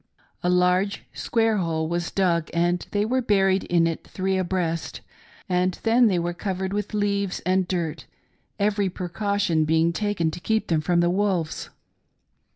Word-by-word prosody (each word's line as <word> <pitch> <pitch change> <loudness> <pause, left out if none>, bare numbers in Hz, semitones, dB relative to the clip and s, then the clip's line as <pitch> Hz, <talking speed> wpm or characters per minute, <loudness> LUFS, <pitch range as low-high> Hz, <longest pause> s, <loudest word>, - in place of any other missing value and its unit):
A 180 - 0
large 180 +2 +2
square 225 -2 +1
hole 160 -3 -1
was 170 +1 -2
dug 170 -4 +1
and 175 +1 +1
they 205 0 0
were 255 +3 +1
buried 195 -4 +2
in 170 -1 +3
it 165 -1 -2
three 190 0 -1
abreast, 175 -3 -2 0.5
and 180 -1 +1
then 235 +1 +5
they 190 -4 +2
were 175 0 -1
covered 190 +1 -3
with 210 +1 -3
leaves 200 -2 0
and 185 0 +1
earth, 160 -6 -3 0.5
every 205 -1 +1
precaution 185 -1 0
being 160 +2 +2
taken 205 -5 0
to 155 - -7
keep 220 +5 -1
them 160 -2 +2
from 170 +2 +2
the 175 0 +2
wolves. 185 -4 -1
185 Hz, 160 wpm, -24 LUFS, 170-200 Hz, 0.5 s, then